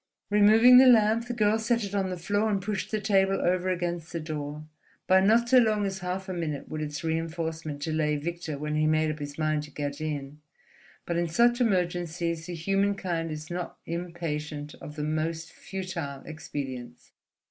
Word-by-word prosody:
Removing 220 +5 +7
the 260 - +8
lamp, 225 0 +5
the 245 - -3
girl 215 -1 +2
set 230 +1 +1
it 200 -1 -5
on 195 -2 0
the 180 - -4
floor, 205 +5 0
and 200 -2 +1
pushed 195 0 -3
the 215 - -1
table 195 -2 +2
over 185 +1 +1
against 175 -2 -2
the 170 - -3
door. 150 -1 -5 0.4
By 190 0 +5
not 225 +4 +4
so 260 0 +7
long 215 -3 +2
as 190 -1 -3
half 185 +1 -4
a 185 - -3
minute 155 -5 -3
would 155 0 -5
its 150 +1 -4
reinforcement 160 -2 -3
delay 155 -1 0
Victor 160 0 -4
when 150 +1 -3
he 155 0 +2
made 155 0 +2
up 155 - -7
his 145 -1 -6
mind 155 -1 +1
to 150 - -9
get 145 +1 -4
in. 150 -1 -4 0.6
But 170 - -1
in 170 0 +1
such 240 +8 +3
emergencies 175 -5 0
the 175 - -5
human 195 +4 +1
kind 170 -4 -2
is 155 +1 -7
not 175 0 -4
impatient 155 -4 -4
of 150 - -9
the 150 - -3
most 160 +2 -2
futile 170 -8 -6
expedients. 130 -5 -7
170 Hz, 190 wpm, -27 LUFS, 155-195 Hz, 0.6 s, the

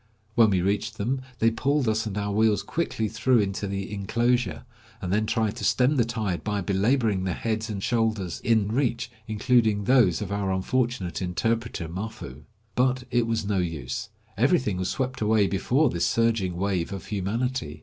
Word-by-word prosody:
When 110 -1 +5
we 95 -3 +1
reached 105 +3 -1
them, 130 +6 -1 0.2
they 115 0 +3
pulled 135 +3 0
us 110 0 +1
and 105 -1 -4
our 100 0 -1
wheels 110 0 +2
quickly 155 -9 -2
through 115 +4 +2
into 100 -1 0
the 100 +1 -4
inclosure, 120 +6 0 0.3
and 90 0 -3
then 110 +1 +1
tried 110 -1 0
to 110 - -6
stem 125 +7 +3
the 120 - +4
tide 110 -6 -2
by 105 -1 -1
belaboring 100 +2 +1
the 95 -2 -1
heads 110 +2 -2
and 100 -2 -4
shoulders 110 -6 0
in 110 -3 +2
reach, 120 0 0 0.2
including 110 -1 +2
those 110 -8 +4
of 100 -2 -5
our 100 -1 -1
unfortunate 95 -2 -1
interpreter, 110 +1 -1
Mafoo. 85 - -7 0.3
But 130 +2 +1
it 120 -1 +2
was 115 -2 -1
no 100 -2 0
use. 85 - -3 0.3
Everything 125 - +2
was 90 0 -1
swept 130 -1 -2
away 105 -1 +3
before 125 +9 +2
this 85 - 0
surging 115 -6 +1
wave 95 -2 -1
of 100 - -6
humanity. 105 - -2
110 Hz, 175 wpm, -26 LUFS, 95-120 Hz, 0.3 s, When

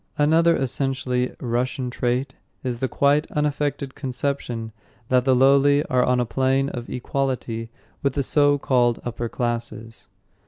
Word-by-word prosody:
Another 165 +3 +4
essentially 130 -1 -1
Russian 125 +1 -2
trait 125 +2 -1 0.3
is 125 -2 -3
the 130 - 0
quite 145 +3 +2
unaffected 145 -2 -1
conception 125 -4 -3 0.4
that 125 -1 +3
the 130 -1 +4
lowly 140 +2 +5
are 125 -1 +3
on 125 0 +2
a 125 - +1
plane 135 +3 +1
of 120 -3 -7
equality 125 -3 -3 0.3
with 140 -2 0
the 140 - 0
so 145 +1 +3
called 120 -4 +2
upper 120 -1 -3
classes. 115 -1 -4
130 Hz, 135 wpm, -23 LUFS, 120-140 Hz, 0.4 s, lowly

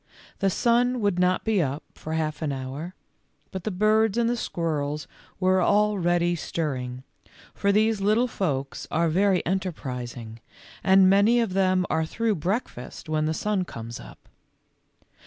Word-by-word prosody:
The 195 - +2
sun 245 +4 +2
would 200 -4 +1
not 180 0 +2
be 220 -4 +2
up 140 0 -2
for 160 - -7
half 155 -1 -2
an 155 -2 -1
hour, 140 +7 -6 0.6
but 190 -2 -6
the - - 0
birds 215 +2 +2
and 235 -1 +2
the 240 - +1
squirrels 150 -8 -2 0.3
were 185 0 +3
already 175 -4 +2
stirring, 130 -6 -4 0.5
for 200 - +1
these 215 0 +2
little 215 +5 +3
folks 140 - -3
are 165 +1 +1
very 190 +3 +2
enterprising, 125 - -4 0.4
and 190 0 +6
many 200 +5 +5
of 225 -6 0
them 185 -1 +2
are 160 0 +1
through 225 +4 0
breakfast 175 - -4
when 155 -1 +1
the 160 - 0
sun 210 0 0
comes 115 -7 -8
up. - - -12
180 Hz, 150 wpm, -25 LUFS, 155-205 Hz, 0.6 s, and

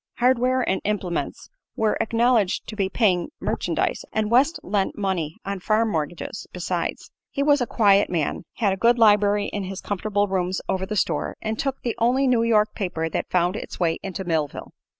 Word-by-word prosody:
Hardware 255 +1 +2
and 190 - 0
implements 195 -4 -3 0.2
were 220 -1 +1
acknowledged 230 -4 +2
to 215 - -7
be 195 -3 0
paying 190 -3 +1
merchandise, - - -1
and 215 0 -1
West 275 +7 +3
lent 195 0 -1
money 185 -6 -2
on 200 0 -3
farm 215 +3 +1
mortgages, 160 0 -4
besides. - - -3 0.2
He 280 - -1
was 290 -1 +4
a 245 - 0
quiet 200 -3 +4
man, 165 -4 -2
had 200 -4 +1
a - - -4
good 235 +4 +4
library 205 -2 +4
in 205 -2 -4
his 190 +1 -6
comfortable 205 +1 -1
rooms 185 -1 -1
over 190 0 -1
the 215 - -3
store, 165 -6 -1
and 220 0 -3
took 275 -1 -2
the 235 - -1
only 250 +4 +3
New 250 -3 +3
York 215 -2 +3
paper 165 -4 -2
that - - -2
found 180 +1 +1
its - - -7
way 165 -2 +1
into 190 0 -5
Millville. 160 -5 -2
205 Hz, 185 wpm, -24 LUFS, 185-230 Hz, 0.2 s, was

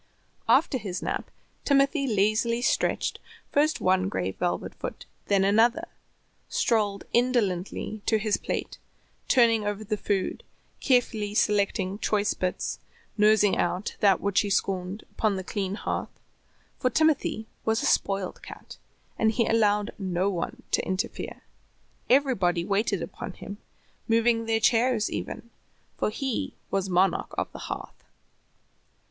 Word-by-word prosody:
After 260 - +4
his 195 -4 -5
nap - - -3 0.3
Timothy 275 0 +3
lazily 220 +2 +1
stretched - - 0 0.3
first 300 +2 +2
one 185 +1 +2
gray 95 - -2
velvet - - -2
foot, - - -7 0.2
then 200 -1 +3
another, 230 - +3 0.6
strolled 210 -4 +1
indolently 215 -4 0
to 220 - +4
his 215 -1 0
plate, - - -4 0.5
turning 230 -4 +4
over 205 +1 -3
the 215 0 -2
food, 195 -1 -2 0.4
carefully 225 -5 +1
selecting 200 -2 +1
choice 210 -2 +1
bits, 185 -1 -3 0.4
nosing 210 -2 +4
out 180 +4 -1
that 200 -3 +4
which 200 -1 +2
he 205 - -3
scorned 190 +1 -1
upon 215 -3 0
the 190 - -4
clean 195 0 -3
hearth, - - -4 0.6
for 255 - +2
Timothy 300 -7 +1 0.2
was 220 0 +1
a - - 0
spoiled 195 -2 0
cat, - - -11 0.4
and 220 0 +4
he 230 +1 +1
allowed 210 -1 +2
no 185 0 0
one 175 -3 -4
to - - +2
interfere. 190 +1 -4 0.7
Everybody 195 -11 +3
waited 200 -2 0
upon 190 - -7
him, 200 +3 -9 0.5
moving 230 0 +2
their 225 0 +2
chairs 230 0 +2
even, 235 - -5 0.4
for - - 0
he 255 +3 -3 0.2
was 195 -1 0
monarch 185 +2 +1
of - - -2
the - - -9
hearth. - - -7
210 Hz, 130 wpm, -27 LUFS, 195-230 Hz, 0.7 s, After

